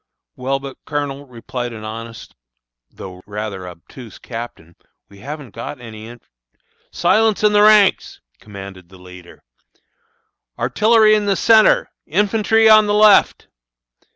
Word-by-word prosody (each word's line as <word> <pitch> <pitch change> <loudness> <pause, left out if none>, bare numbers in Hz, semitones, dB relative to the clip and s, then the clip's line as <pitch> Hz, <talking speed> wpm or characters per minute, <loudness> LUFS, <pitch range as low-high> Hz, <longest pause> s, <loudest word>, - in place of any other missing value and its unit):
"Well, 135 +2 -2
but, 135 -1 -10
Colonel," 145 -2 -5
replied 120 0 -7
an 110 -1 -10
honest, 115 +1 -9 0.6
though 90 -1 -12
rather 100 -3 -6
obtuse 95 +6 -13
captain, 115 -9 -10 0.3
"we 100 - -17
haven't 140 0 -9
got 115 +4 -8
any 110 -2 -11
inf 120 0 -15 0.4
" - - -48 0.3
"Silence 220 -1 +1
in 210 0 +3
the 205 - +4
ranks!" 210 -2 +3 0.2
commanded 95 -4 -12
the 95 - -16
leader. 90 -1 -15 1.1
"Artillery 215 0 +3
in 210 -1 0
the 200 - +1
centre, 220 0 +3 0.2
infantry 215 +5 +1
on 215 -1 +6
the 205 - 0
left." 210 -1 +3
125 Hz, 130 wpm, -18 LUFS, -, 1.1 s, on